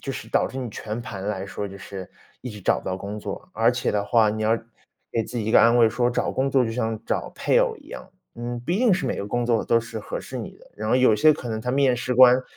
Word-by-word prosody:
就 135 - -4
是 110 - -7
导 - - +2
致 130 - -9
你 125 -3 -4
全 110 +2 -5
盘 100 -5 -7
来 95 -2 -2
说， 100 +1 -5
就 100 - -9
是 95 -1 -8 0.3
一 125 - -5
直 105 -2 -10
找 - - +2
不 - - -13
到 95 - -1
工 100 +2 -6
作。 185 - -7
而 115 +2 +3
且 120 - -1
的 100 -1 0
话， 110 -1 +3
你 110 0 -3
要 110 +2 +3 0.6
给 115 - +1
自 125 - -7
己 110 - -2
一 110 - -1
个 - - +7
安 115 +1 +5
慰， 115 -2 +6
说 120 +2 +1
找 - - -1
工 135 +1 0
作 130 -2 +3
就 115 - -2
像 110 -2 -2
找 - - -1
配 - - +2
偶 485 -3 0
一 - - -18
样， 190 - -9 0.2
嗯， 120 +1 -5
不 165 +8 -3
一 195 - +1
定 240 -5 +4
是 170 -7 0
每 - - -1
个 - - -4
工 120 +3 -1
作 115 -2 +1
都 115 - +3
是 115 -1 -7
合 - - -5
适 - - -8
你 - - -6
的。 - - -20
然 110 +1 -4
后 - - +4
有 130 -4 +5
些 155 +9 +5
可 130 -5 -7
能 110 -1 -3
他 125 - -2
面 135 -1 +3
试 125 +1 -2
官 125 0 +7
115 Hz, 320 characters per minute, -24 LUFS, 110-125 Hz, 0.6 s, 个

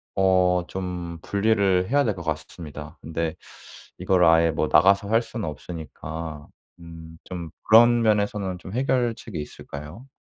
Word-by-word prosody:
어 90 -2 +3
좀 90 -3 -5
분리를 100 -3 +1
해야 145 +2 +3
될 105 -6 0
것 85 - -8
같스 80 -1 -3
습니다. 75 -2 -9
근데 80 0 -3 0.6
이거를 90 -1 +3
아예 80 0 +5
뭐 - - -1
나가서 100 +2 +4
할 115 +1 +4
수는 115 -5 -6
없으니까 80 0 -7 0.3
음 80 -1 -11
좀 85 -3 -7
그런 120 +2 +6
면에서는 105 -3 0
좀 95 +2 -10
해결책이 120 - -1
있을까요? 75 - -9
90 Hz, 290 characters per minute, -24 LUFS, 80-105 Hz, 0.6 s, 그런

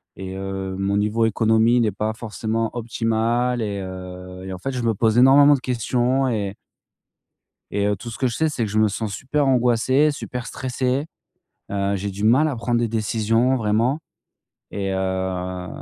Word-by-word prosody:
et 95 0 -7
heu, 95 0 -4
mon 100 +1 0
niveau 105 +2 +1
économie 110 +2 +3
n'est 110 -2 +2
pas 105 +3 -2
forcément 115 0 -3
optimal 120 +1 0
et 100 -2 -2
heu, 90 -1 -8
et 95 - -5
en - - -5
fait, 135 +9 -4
je 125 -2 -3
me 115 -2 +1
pose 110 +2 +3
énormément 140 +3 +7
de 140 - +1
questions 125 +2 0
et 105 -5 -2 1.2
et 100 - 0
heu, 105 0 +1
tout 120 +5 -8
ce 115 - -8
que 130 - +1
je 115 - -2
sais, 160 - +2
c'est 130 -6 -2
que 105 - -4
je 105 - 0
me 110 0 +4
sens 105 +1 -3
super 140 +6 -1
angoissé, 130 +3 +3
super 125 -3 -6
stressé. 130 +2 -2 0.7
Heu, 100 0 0
j'ai 100 +1 -3
du 100 +2 -6
mal 130 +8 +5
à 145 - -2
prendre 120 0 0
des 120 - +1
décisions 115 +3 +1
vraiment 115 +5 +1 0.7
et 95 -1 -3
heu, 95 -1 -2
110 Hz, 180 wpm, -22 LUFS, 100-125 Hz, 1.2 s, énormément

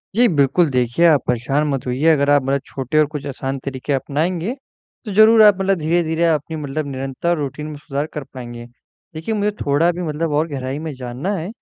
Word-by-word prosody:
जी 245 +1 +5
बिल्कुल, 150 - +2
देखिए 125 +6 +1
आप 150 -5 +4
परेशान 135 +5 0
मत 135 -3 -2
होइए, 130 +5 -1
अगर 140 -1 +1
आप 145 -1 +5
मतलब 135 0 0
छोटे 135 +3 -3
और 155 - +5
कुछ 145 -1 -5
आसान 135 0 -4
तरीके 140 +1 -3
अपनाएँगे, 165 - -1 0.5
तो 210 - -5
ज़रूर 220 +2 +7
आप 205 -2 +6
मतलब 195 -1 +1
धीरे-धीरे 160 +1 +1
अपनी 160 0 -1
मतलब 145 0 -4
निरंतर 135 +6 -2
रूटीन 150 +1 -4
में 150 - -7
सुधार 145 0 -3
कर 150 - -4
पाएँगे। 120 -2 -8 0.5
देखिए 190 +8 -3
मुझे 210 0 0
थोड़ा 150 +5 +2
भी 175 +1 -6
मतलब 155 +1 -2
और 155 +3 +1
गहराई 135 -1 -4
में 160 -1 -5
जानना 130 +10 -4
है, 165 +2 -4
150 Hz, 200 wpm, -20 LUFS, 135-170 Hz, 0.5 s, ज़रूर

